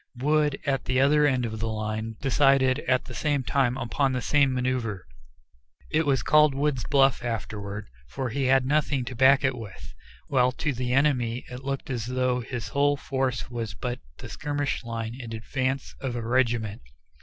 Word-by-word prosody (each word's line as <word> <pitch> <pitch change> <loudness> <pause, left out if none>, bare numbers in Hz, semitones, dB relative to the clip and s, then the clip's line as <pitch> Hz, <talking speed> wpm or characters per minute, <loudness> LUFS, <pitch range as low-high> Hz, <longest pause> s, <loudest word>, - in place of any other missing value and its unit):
Wood, 150 +2 +1
at 135 -1 0
the 130 0 +1
other 150 +2 +4
end 130 -3 +1
of 110 -1 -5
the 115 - -1
line, 110 +1 -3
decided 135 -1 +3
at 130 -1 +2
the - - -9
same 145 -3 0
time 125 +2 +1
upon 135 +2 0
the 125 - -1
same 140 +2 +3
manoeuvre. 125 -6 -1 0.9
It 155 0 +1
was 135 -4 +2
called 150 -2 +5
"Wood's 140 -4 0
bluff" 135 -3 +3
afterward, 105 -3 -4 0.2
for 130 - -4
he 135 +3 -1
had 130 0 +4
nothing 140 -2 +1
to 130 - -6
back 135 +3 +5
it 130 -1 +1
with; 110 -6 -10 0.3
while 125 -2 +2
to 150 +1 -2
the 125 0 -3
enemy 125 -3 +1
it 125 +1 -7
looked 135 +2 -4
as 120 -3 -3
though 125 0 0
his 120 -1 -5
whole 145 0 +2
force 130 -3 -2
was 115 -3 -4
but 125 -1 -4 0.2
the - - -9
skirmish 145 -2 -3
line 115 -1 -4
in 120 -3 -7
advance 130 +4 -2
of 130 -3 -3
a 115 -1 -4
regiment. 120 -4 0
130 Hz, 180 wpm, -26 LUFS, 120-140 Hz, 0.9 s, called